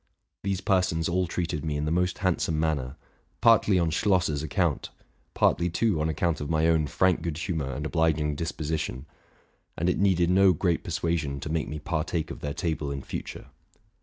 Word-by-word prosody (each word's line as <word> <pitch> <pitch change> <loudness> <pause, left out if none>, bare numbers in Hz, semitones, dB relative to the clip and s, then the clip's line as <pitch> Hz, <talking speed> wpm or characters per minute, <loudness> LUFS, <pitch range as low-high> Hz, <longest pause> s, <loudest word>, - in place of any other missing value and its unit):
'These 95 -1 -2
persons 90 -5 +1
all 90 +1 0
treated 80 -3 -3
me 75 -2 -2
in 75 - -2
the 75 - -1
most 90 +2 +1
hand 95 -2 0
some 80 -1 0
manner, 75 -4 -1 0.4
partly 115 -4 +5
on 85 -2 +1
Schlosser's 85 -5 +1
account 75 -2 -1 0.2
— - - -40
partly, 85 +1 +2
too, 90 -2 +1
on 80 - 0
account 80 +1 0
of 75 - -4
my 80 -1 +2
own 80 -2 +2
frank 95 +5 +2
good 80 -3 -3
humor 80 -5 -2
and 75 +4 -4
obliging 80 -2 +1
dispo 80 0 -4
sition; 75 -4 -3 0.7
and 85 +3 +1
it - - -2
needed 90 -3 +3
no 95 0 +5
great 85 +1 0
persuasion 75 -5 -2
to 75 - -5
make 80 -1 -1
me 75 - -5
par 80 +1 -2
take 80 -1 -3
of - - -7
their 75 -1 -4
table 80 -4 -2
in 70 -1 -4
future. - - -7
80 Hz, 195 wpm, -27 LUFS, 75-90 Hz, 0.7 s, partly